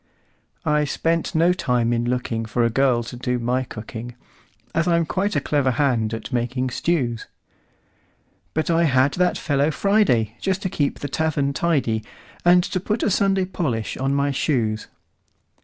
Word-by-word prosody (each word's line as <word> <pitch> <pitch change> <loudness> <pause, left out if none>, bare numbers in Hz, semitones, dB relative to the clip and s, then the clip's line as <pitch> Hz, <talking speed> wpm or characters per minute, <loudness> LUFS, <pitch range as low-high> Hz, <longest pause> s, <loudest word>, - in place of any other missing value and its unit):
I 150 -1 +2
spent 165 +4 -1
no 170 +3 +4
time 125 -9 0
in 120 0 0
lookingFor 120 -1 -1
a 115 - +1
girl 125 -1 +2
to 120 - -8
do 125 0 -1
my 125 +2 0
cooking, 115 +1 -8 0.6
As 165 +1 +1
I'm 170 -1 +3
quite 190 +9 -1
a - - +3
clever 140 -1 +1
hand 120 -4 +1
at 115 - -8
making 125 +1 -1
stews; 125 -6 -1 1.3
But 160 +2 0
I 165 0 +3
had 130 -1 +3
that 180 0 +1
fellow 145 -1 +1
Friday, 150 - +2
Just 190 0 -1
to 185 - -1
keep 145 -5 -1
the 145 - -2
tavern 145 -2 0
tidy, 135 -10 0 0.4
And 175 +1 +6
to 185 - -2
put 210 +4 -2
a - - +2
Sunday 195 0 +2
polish 130 - -2
on 135 +1 -1
my 140 0 +1
shoes. 115 -6 -1
140 Hz, 160 wpm, -22 LUFS, 120-170 Hz, 1.3 s, And